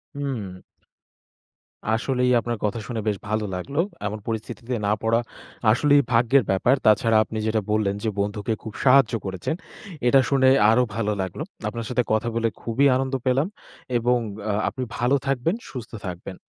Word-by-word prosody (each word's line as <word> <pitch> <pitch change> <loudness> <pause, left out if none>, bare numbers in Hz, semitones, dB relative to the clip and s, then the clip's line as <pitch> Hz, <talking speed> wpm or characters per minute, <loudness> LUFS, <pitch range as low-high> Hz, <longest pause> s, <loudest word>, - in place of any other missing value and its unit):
হুম। 125 -10 -4 1.4
আসলেই 125 +1 +1
আপনার 120 0 -3
কথা 105 +2 -1
শুনে 115 -3 -3
বেশ 105 -2 +1
ভালো 110 0 0
লাগলো। 140 - -4 0.3
এমন 105 +1 -4
পরিস্থিতিতে 115 +2 -4
না 100 - +2
পড়া 115 +1 +2 0.5
আসলেই 145 +4 +4
ভাগ্যের 120 +3 +4
ব্যাপার। 110 +7 +3
তাছাড়া 110 +1 +4
আপনি 110 +1 -7
যেটা 110 0 +1
বললেন 105 -2 +1
যে 110 - +1
বন্ধুকে 105 +2 -1
খুব 110 -2 -7
সাহায্য 135 -2 +5
করেছেন। 95 - -3 0.5
এটা 135 +3 +6
শুনে 130 -2 +4 0.2
আরো 125 +2 +4
ভালো 105 -2 0
লাগলো। 95 -2 -4 0.2
আপনার 115 -1 -4
সাথে 125 -1 +1
কথা 110 +2 +1
বলে 115 0 +1
খুবি 120 +5 +1
আনন্দ 130 +1 -1
পেলাম। 135 +6 +2 0.5
এবং 125 +1 +2 0.3
আ - - +2 0.2
আপনি 130 - -5
ভালো 125 +3 +2
থাকবেন, 135 - +1 0.2
সুস্থ 125 -4 -7 0.2
থাকবেন। 90 +1 -7
115 Hz, 155 wpm, -24 LUFS, 110-130 Hz, 1.4 s, এটা